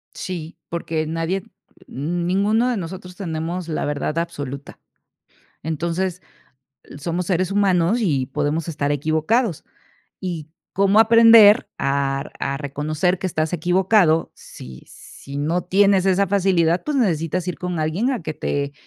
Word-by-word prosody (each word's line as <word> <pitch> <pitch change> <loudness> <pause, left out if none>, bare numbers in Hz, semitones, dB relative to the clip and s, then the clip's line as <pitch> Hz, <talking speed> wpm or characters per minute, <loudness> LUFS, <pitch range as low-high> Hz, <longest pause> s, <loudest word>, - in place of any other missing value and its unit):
Sí, 175 -4 -6
porque 165 -2 -2
nadie 165 +4 -2 0.4
ninguno 185 - 0
de 245 - -1
nosotros 180 0 -7
tenemos 170 -1 -4
la 160 - -2
verdad 145 +2 -2
absoluta. 145 -5 -5 0.8
Entonces, 170 +4 -2 0.8
somos 170 +4 -3
seres 185 0 0
humanos 195 0 +2
y 140 - 0
podemos 150 +4 -2
estar 145 -3 -2
equivocados. 160 - 0 0.6
Y, 165 -4 -5 0.2
¿cómo 200 +2 +3
aprender 225 -2 +7
a 140 0 -1
a 140 0 -2
reconocer 155 +5 -1
que 190 - -2
estás 155 -1 -2
equivocado? 175 0 +2
Si 65 0 -12
si 140 +1 -11
no 165 +5 0
tienes 195 0 +3
esa 190 +1 +3
facilidad, 185 -3 +2
pues, 300 -2 -1
necesitas 175 - 0
ir 170 -6 -3
con 180 -2 -3
alguien 165 +11 0
a 240 -8 -3
que 155 - -4
te 145 -1 -3
170 Hz, 130 wpm, -21 LUFS, 155-190 Hz, 0.8 s, aprender